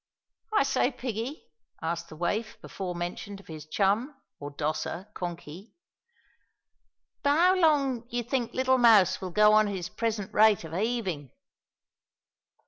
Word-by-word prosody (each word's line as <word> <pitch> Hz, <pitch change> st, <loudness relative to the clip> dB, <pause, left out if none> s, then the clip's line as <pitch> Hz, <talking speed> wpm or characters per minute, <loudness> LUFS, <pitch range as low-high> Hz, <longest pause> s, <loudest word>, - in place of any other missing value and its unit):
"I 425 Hz, -, +4 dB
say, 270 Hz, -2 st, +1 dB
Piggie," 250 Hz, +2 st, -5 dB, 0.4 s
asked 170 Hz, +1 st, -4 dB
the -, -, -10 dB
waif 210 Hz, +7 st, -2 dB
before 185 Hz, -2 st, -6 dB
mentioned 175 Hz, +3 st, -5 dB
of 200 Hz, -, -16 dB
his 155 Hz, -1 st, -9 dB
chum, 215 Hz, -, 0 dB, 0.2 s
(or 145 Hz, -, -6 dB
dosser), 155 Hz, +7 st, -4 dB
Konky, 175 Hz, +3 st, -7 dB, 1.5 s
"'ow 325 Hz, +6 st, +4 dB
long 280 Hz, -9 st, +2 dB
d'ee 240 Hz, 0 st, -3 dB
think 240 Hz, 0 st, -2 dB
little 260 Hz, 0 st, +2 dB
Mouse 200 Hz, -6 st, +5 dB
will 185 Hz, -, -4 dB
go 210 Hz, +4 st, +5 dB
on 215 Hz, 0 st, +5 dB
at 200 Hz, -, -3 dB
his 180 Hz, -1 st, -5 dB
present 215 Hz, -1 st, -3 dB
rate 215 Hz, -4 st, +4 dB
o' 160 Hz, -, -9 dB
heavin'?" 190 Hz, -, -2 dB
210 Hz, 135 wpm, -28 LUFS, 175-245 Hz, 1.5 s, Mouse